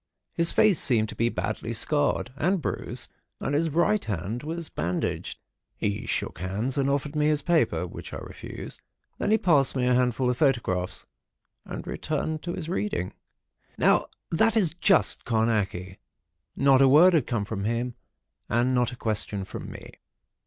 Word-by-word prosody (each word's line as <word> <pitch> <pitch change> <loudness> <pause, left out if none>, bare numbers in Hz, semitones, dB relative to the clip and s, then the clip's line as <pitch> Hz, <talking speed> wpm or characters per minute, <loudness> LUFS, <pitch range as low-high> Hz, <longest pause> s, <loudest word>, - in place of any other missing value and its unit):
His 170 0 +4
face 215 -5 +4
seemed 110 -5 +2
to - - -7
be 115 +1 +1
badly 110 +1 -3
scarred 145 +1 0
and 180 +7 +1
bruised, - - -4 0.3
and - - -2
his 160 +3 +2
right 175 +7 +2
hand 105 +3 -3
was 165 +1 -4
bandaged. 90 +2 -3 0.4
He 100 0 -2
shook - - -2
hands 100 +8 -2
and 140 -1 +1
offered 140 +2 -1
me 150 0 +2
his 150 -2 +1
paper, 150 - +2
which 90 - -9
I - - -5
refused. - - -8 0.4
Then - - 0
he 220 - +5
passed 145 -11 +3
me 125 -1 +1
a 125 - +3
handful 125 0 +2
of 125 - -3
photographs, 115 - 0 0.6
and - - -6
returned 155 0 -3
to 175 - -4
his 165 -3 -5
reading. 175 - -2 0.6
Now, - - +3 0.2
that 220 +7 +3
is 180 -8 +2
just 190 +3 +2
Carnacki. 105 -5 0 0.6
Not 135 -1 +5
a 135 - +7
word 160 +7 +7
had 155 -7 +2
come 110 -5 -1
from 100 -2 -4
him, 120 +2 -1 0.6
and 120 +2 +2
not 125 -2 +2
a - - -7
question 105 -3 -2
from - - -7
me. - - -11
130 Hz, 165 wpm, -26 LUFS, 110-155 Hz, 0.6 s, a